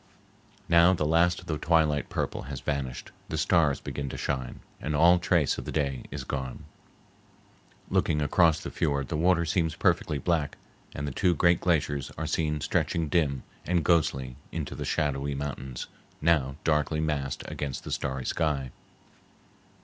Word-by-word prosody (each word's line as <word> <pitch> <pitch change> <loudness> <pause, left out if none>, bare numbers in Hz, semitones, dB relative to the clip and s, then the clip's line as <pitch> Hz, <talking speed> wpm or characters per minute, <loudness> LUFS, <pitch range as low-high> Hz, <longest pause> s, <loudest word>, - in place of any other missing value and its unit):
Now 85 +2 +6
the 75 - -1
last 85 +2 +3
of - - -15
the 75 -2 -3
twilight 80 -3 +2
purple - - -2
has 70 -3 -4
vanished, 70 -4 -3 0.2
the 80 - -2
stars 80 -3 +3
begin 70 -1 -5
to - - -6
shine, 65 -3 -3 0.2
and 75 0 -2
all 85 +4 +6
trace 85 -4 +2
of - - -7
the - - -4
day 70 -4 -1
is - - -5
gone. 65 -2 -4 1.2
Looking 75 - +1
across 80 +2 +3
the - - -6
fiord 70 -3 -1
the 80 - -2
water 85 +1 +3
seems 80 -1 0
perfectly 75 - +1
black, 75 0 0 0.4
and 70 +1 -3
the - - -2
two 90 +5 +2
great 85 +2 +3
glaciers 75 -5 0
are 80 - -2
seen 75 -1 -1
stretching 80 +1 0
dim 70 -5 +1 0.2
and 85 -3 0
ghostly 65 -7 +1
into 80 -4 -4
the - - -5
shadowy 70 -1 0
mountains 70 -3 -5 0.3
now 75 -5 +2
darkly 75 0 +1
massed 75 -4 -2
against 70 -3 -4
the - - -7
starry 65 -2 -2
sky. 70 -6 -1
75 Hz, 160 wpm, -28 LUFS, 70-85 Hz, 1.2 s, Now